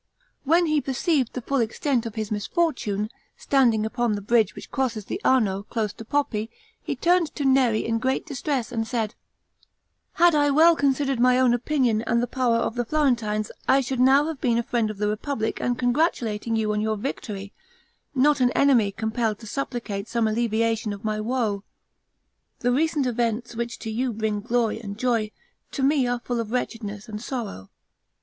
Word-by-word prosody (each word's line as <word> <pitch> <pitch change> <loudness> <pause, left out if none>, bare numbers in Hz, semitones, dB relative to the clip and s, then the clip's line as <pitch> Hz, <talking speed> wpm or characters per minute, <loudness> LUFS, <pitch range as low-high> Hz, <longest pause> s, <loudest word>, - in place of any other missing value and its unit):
When 335 +5 +4
he 305 -2 +2
perceived 270 -1 0
the 255 - -5
full 275 +2 0
extent 235 +1 0
of 225 - -8
his 215 -1 -4
misfortune, 215 - -1 0.3
standing 260 - +2
upon 240 0 0
the 205 - -3
bridge 225 +2 +2
which - - -10
crosses 240 -6 -1
the 380 - -5
Arno, 210 -7 +2
close 210 -1 -3
to - - -10
Poppi, 225 -4 -1 0.3
he - - -3
turned 345 -2 +2
to 285 - -2
Neri 260 -5 +3
in 230 0 0
great 260 +3 -1
distress, 275 -3 -2
and 225 -2 -2
said, 225 -3 -2 1.0
"Had 345 0 +5
I 290 -1 +3
well 320 +4 +6
considered 275 -2 +1
my 250 +1 +5
own 255 -2 +4
position 250 -5 +1
and 235 +1 +1
the 240 - +1
power 245 -1 +1
of 230 - -1
the 245 0 -1
Florentines, 235 -7 0 0.2
I 265 +1 +5
should 260 -1 -2
now 270 +3 +5
have 315 -3 -5
been 235 -2 +2
a 235 - +1
friend 230 -2 0
of 215 - -6
the 210 +1 0
republic 220 +2 -2
and 245 -1 0
congratulating 240 -5 0
you 215 -1 0
on 210 - 0
your 215 0 0
victory, 200 -4 -5 0.6
not 285 +2 +4
an 250 -1 +4
enemy 245 -8 +4
compelled 220 +1 -1
to - - -10
supplicate 225 -4 -4
some 235 -2 +1
alleviation 225 0 0
of 200 +1 -9
my 215 0 -1
woe. 220 -4 -1 1.0
The 245 - +2
recent 300 +1 +1
events 235 -1 -1
which 235 0 -3
to 220 - -6
you 245 +2 -1
bring 215 -1 -1
glory 230 0 0
and 205 -3 -7
joy, 230 -3 0 0.4
to 275 - -2
me 275 -2 +3
are 245 0 -1
full 245 -1 -2
of 225 -2 -3
wretchedness 225 -3 -4
and 210 -1 -6
sorrow. 225 - -5
235 Hz, 185 wpm, -24 LUFS, 220-265 Hz, 1.0 s, well